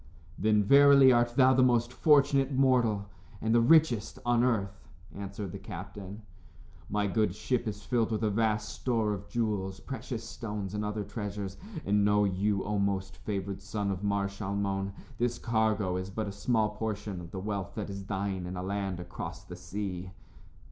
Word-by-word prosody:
"Then, 105 0 +3
verily, 140 +3 +7
art 120 -1 +2
thou 130 0 +6
the 130 - +4
most 120 -1 +3
fortunate 140 -2 +4
mortal, 125 -6 +2 0.3
and 110 0 0
the 120 - +5
richest, 135 -5 +4
on 120 0 +3
earth," 100 -6 -1 0.3
answered 100 -1 -5
the 100 - -7
captain. 100 +1 -8 0.7
"My 105 0 0
good 100 -1 +1
ship 120 +2 -1
is 105 -1 -5
filled 115 +2 +1
with 110 0 -1
a 105 - +2
vast 105 0 +1
store 115 -4 0
of 100 0 -7
jewels, 105 -5 -1
precious 130 -4 -5
stones 105 -4 -5
and 105 0 -2
other 105 0 -2
treasures. 100 -2 -5 0.3
And 100 0 +3
know 105 0 +4
you, 100 +1 0
O 105 0 -1
most 100 -1 -1
favored 100 -1 -4
son 100 0 -2
of 95 +1 -4
Mar 100 -1 +1
Shalmon, 100 -1 -2 0.3
this 120 0 0
cargo 110 -5 +1
is 95 +1 -4
but 105 +2 -3
a - - -3
small 110 +1 +1
portion 105 -3 -4
of 85 - -9
the 95 - -6
wealth 100 -1 -4
that 105 -2 -4
is 100 0 -6
thine 95 -2 -2
in 90 +1 -5
a 90 - -3
land 95 -1 -2
across 90 0 -7
the 90 - -9
sea." 90 +1 -5
105 Hz, 175 wpm, -30 LUFS, 100-115 Hz, 0.7 s, verily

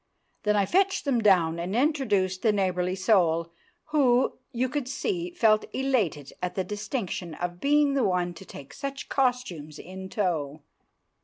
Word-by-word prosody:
Then 210 0 +1
I 200 -1 +3
fetched 385 - +1
them 255 -5 +2
down 170 -6 +3
and 180 +4 -3
introduced 220 - +1
the 220 - +4
neighbourly 185 -2 0
soul, 170 -4 +2 0.4
who, 260 -5 +3
you 250 0 0
could 260 0 -3
see, 350 - -2
felt 220 -11 +3
elated 215 - 0
at 180 0 -3
the 190 - 0
distinction 200 - -4
of 175 +2 -5
being 290 0 +3
the 275 -2 +2
one 180 -3 0
to 170 - -11
take 140 -6 -11
such 275 -1 -6
costumes 245 - -1
in 190 +2 -9
tow. 155 -8 -2
205 Hz, 155 wpm, -27 LUFS, 180-265 Hz, 0.4 s, the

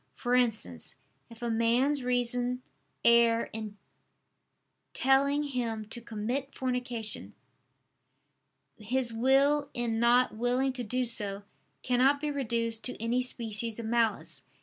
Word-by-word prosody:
For 245 0 -2
instance, 220 - 0 0.3
if 230 +1 -12
a 235 - -1
man's 240 +5 +2
reason 245 0 0 0.4
err 235 -1 +4
in 215 -2 -6 1.2
telling 280 +2 +2
him 235 -6 -3
to 235 - -8
commit 235 +5 -4
fornication, 245 -4 -1 1.4
his 235 +2 -2
will 270 +5 +3
in 235 -2 -1
not 240 0 +3
willing 250 +3 0
to 250 -1 -5
do 250 +3 -1
so, 205 -4 -1 0.4
cannot 260 +3 +3
be 300 0 -2
reduced 230 -4 -1
to 250 - -4
any 235 +3 0
species 230 -3 0
of 230 - -5
malice. 230 -1 0
240 Hz, 120 wpm, -29 LUFS, 225-255 Hz, 1.4 s, err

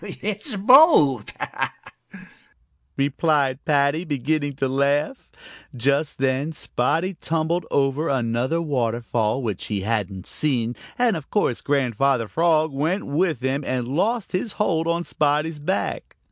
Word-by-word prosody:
"It's 210 +5 -5
both," 200 - +5 1.7
replied 140 -1 +1
Paddy, 145 +2 +2
beginning 145 -1 -1
to 135 0 -1
laugh. 140 - 0 0.5
Just 140 +5 0
then 135 +4 0
Spotty 160 +6 -1
tumbled 165 +2 -1
over 140 +3 +1
another 125 +4 0
waterfall 120 -3 -1
which 105 -6 -3
he 105 -3 -3
hadn't 100 -3 -2
seen, 125 -6 -1 0.2
and 245 -4 +2
of 155 -4 -7
course 170 - 0
Grandfather 135 -3 +1
Frog 160 +2 +2
went 160 +8 -1
with 155 -2 0
him 135 +2 -1
and 125 -2 -2
lost 195 - -1
his 195 +3 -2
hold 165 -6 0
on 170 +1 0
Spotty's 150 0 0
back. 185 +7 -3
145 Hz, 120 wpm, -23 LUFS, 130-165 Hz, 1.7 s, both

